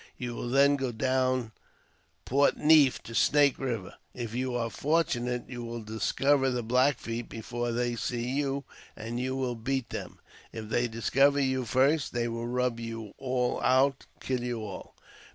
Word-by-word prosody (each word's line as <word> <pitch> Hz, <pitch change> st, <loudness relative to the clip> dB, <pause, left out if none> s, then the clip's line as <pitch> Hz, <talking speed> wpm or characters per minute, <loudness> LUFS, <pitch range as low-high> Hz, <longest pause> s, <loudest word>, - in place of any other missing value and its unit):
You 120 Hz, -1 st, -4 dB
will 120 Hz, -, -4 dB
then 140 Hz, +2 st, +4 dB
go 135 Hz, -2 st, -2 dB
down 130 Hz, 0 st, 0 dB, 0.7 s
Port 140 Hz, +2 st, +3 dB
Neif 150 Hz, -4 st, +5 dB
to 115 Hz, -, -9 dB
Snake 145 Hz, +3 st, +4 dB
Eiver. 115 Hz, -8 st, -3 dB, 0.2 s
If 115 Hz, -3 st, -5 dB
you 125 Hz, 0 st, -2 dB
are 115 Hz, -1 st, -1 dB
fortunate 125 Hz, -6 st, 0 dB
you 120 Hz, -2 st, -6 dB
will 115 Hz, -1 st, -6 dB
discover 135 Hz, +5 st, +1 dB
the 125 Hz, -2 st, -2 dB
Black 130 Hz, +5 st, +3 dB
Feet 115 Hz, 0 st, -5 dB
before 120 Hz, +2 st, -4 dB
they 120 Hz, 0 st, -1 dB
see 120 Hz, +1 st, -2 dB
you, 140 Hz, +1 st, -1 dB, 0.3 s
and 115 Hz, +2 st, -5 dB
you 130 Hz, +1 st, -2 dB
will 130 Hz, -2 st, -1 dB
beat 125 Hz, +2 st, -2 dB
them. -, -, -6 dB, 0.3 s
If 110 Hz, -2 st, -7 dB
they 120 Hz, +2 st, +1 dB
discover 135 Hz, +5 st, +2 dB
you 130 Hz, -2 st, 0 dB
first, 135 Hz, +6 st, +2 dB
they 120 Hz, -1 st, 0 dB
will 115 Hz, 0 st, -4 dB
rub 125 Hz, -1 st, 0 dB
you 115 Hz, -3 st, -6 dB
all 125 Hz, -2 st, -1 dB
out 135 Hz, +2 st, +2 dB
— -, -, -34 dB
kill 130 Hz, -2 st, -2 dB
you 120 Hz, -2 st, -3 dB
all. 100 Hz, -3 st, -8 dB
125 Hz, 170 wpm, -29 LUFS, 115-135 Hz, 0.7 s, Neif